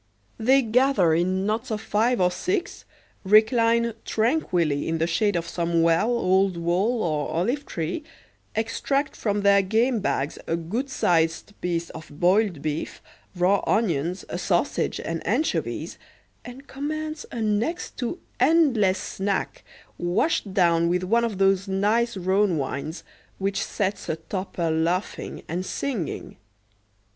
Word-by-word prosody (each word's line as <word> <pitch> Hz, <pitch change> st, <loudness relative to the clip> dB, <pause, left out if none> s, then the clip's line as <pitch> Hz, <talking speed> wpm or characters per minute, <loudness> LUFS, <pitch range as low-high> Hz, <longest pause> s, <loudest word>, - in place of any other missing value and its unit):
They 260 Hz, +4 st, +4 dB
gather 230 Hz, -7 st, +3 dB
in 185 Hz, +3 st, +1 dB
knots 220 Hz, +4 st, -1 dB
of 215 Hz, -2 st, -2 dB
five 225 Hz, +3 st, +1 dB
or 180 Hz, -1 st, +3 dB
six, 355 Hz, -, -3 dB, 0.4 s
recline 230 Hz, +3 st, +4 dB
tranquilly 185 Hz, -, 0 dB
in 165 Hz, -, 0 dB
the 165 Hz, -, +1 dB
shade 195 Hz, +4 st, +1 dB
of 170 Hz, -1 st, -1 dB
some 170 Hz, -1 st, 0 dB
well, 170 Hz, +7 st, +3 dB
old 190 Hz, -5 st, +2 dB
wall, 190 Hz, +8 st, +1 dB
or 150 Hz, -3 st, -1 dB
olive 245 Hz, -, -1 dB
tree, 170 Hz, -, -3 dB, 0.5 s
extract 275 Hz, +5 st, -1 dB
from 205 Hz, -2 st, -1 dB
their 200 Hz, 0 st, +5 dB
game 225 Hz, +5 st, +1 dB
bags 145 Hz, -7 st, -2 dB
a 165 Hz, -, +1 dB
good 210 Hz, -, -3 dB
sized 165 Hz, -3 st, +1 dB
piece 170 Hz, -1 st, -2 dB
of 160 Hz, -, -10 dB
boiled 185 Hz, -3 st, +2 dB
beef, 155 Hz, 0 st, -3 dB, 0.4 s
raw 185 Hz, +3 st, +2 dB
onions, 180 Hz, -4 st, 0 dB
a 175 Hz, -, -4 dB
sausage, 175 Hz, -1 st, 0 dB
and 165 Hz, 0 st, -4 dB
anchovies, 265 Hz, +10 st, -1 dB, 0.4 s
and 255 Hz, +3 st, -10 dB
commence 310 Hz, +3 st, -5 dB
a 235 Hz, -, -5 dB
next 220 Hz, +11 st, -1 dB
to 250 Hz, +7 st, -3 dB, 0.2 s
endless 250 Hz, -, +4 dB
snack, 195 Hz, +1 st, -3 dB, 0.4 s
washed 190 Hz, -, 0 dB
down 170 Hz, -3 st, +3 dB
with 180 Hz, +1 st, 0 dB
one 230 Hz, +6 st, +2 dB
of 225 Hz, -4 st, -2 dB
those 195 Hz, 0 st, +2 dB
nice 210 Hz, +4 st, +1 dB
Rhone 190 Hz, 0 st, +2 dB
wines, 145 Hz, +4 st, -4 dB, 0.3 s
which 195 Hz, 0 st, -1 dB
sets 200 Hz, 0 st, -3 dB
a -, -, 0 dB
toper 170 Hz, 0 st, -3 dB
laughing 170 Hz, +5 st, -2 dB
and 175 Hz, +3 st, -3 dB
singing. 215 Hz, -, -4 dB
195 Hz, 135 wpm, -25 LUFS, 170-230 Hz, 0.5 s, their